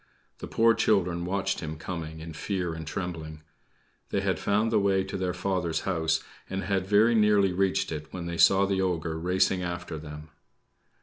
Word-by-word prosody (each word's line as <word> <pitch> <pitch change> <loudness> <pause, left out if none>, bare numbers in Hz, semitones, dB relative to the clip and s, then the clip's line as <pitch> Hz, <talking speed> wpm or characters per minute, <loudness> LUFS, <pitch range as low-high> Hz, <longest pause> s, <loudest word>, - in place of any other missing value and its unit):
The - - -6
poor 115 0 +4
children 90 -6 +1
watched 95 +2 -1
him 80 -1 -5
coming 80 -1 -6
in 80 0 -8
fear 90 +1 -2
and 80 -1 -7
trembling. 80 -4 -5 0.7
They - - 0
had - - 0
found 105 +3 +1
the 110 - +4
way 95 -1 +2
to 95 - -6
their 95 -1 -1
father's 90 -3 -1
home, 85 -4 -2 0.4
and 95 +1 -3
had 95 -1 -1
very 105 +4 +5
nearly 105 -4 +4
reached 95 0 +1
it 75 -1 -6
when 90 -2 -6
they 85 0 -4
saw 95 0 +6
the 95 -1 0
ogre 85 -3 -1
racing 90 +2 +1
after 85 -2 -4
them. 75 0 -9
90 Hz, 180 wpm, -27 LUFS, 80-95 Hz, 0.7 s, saw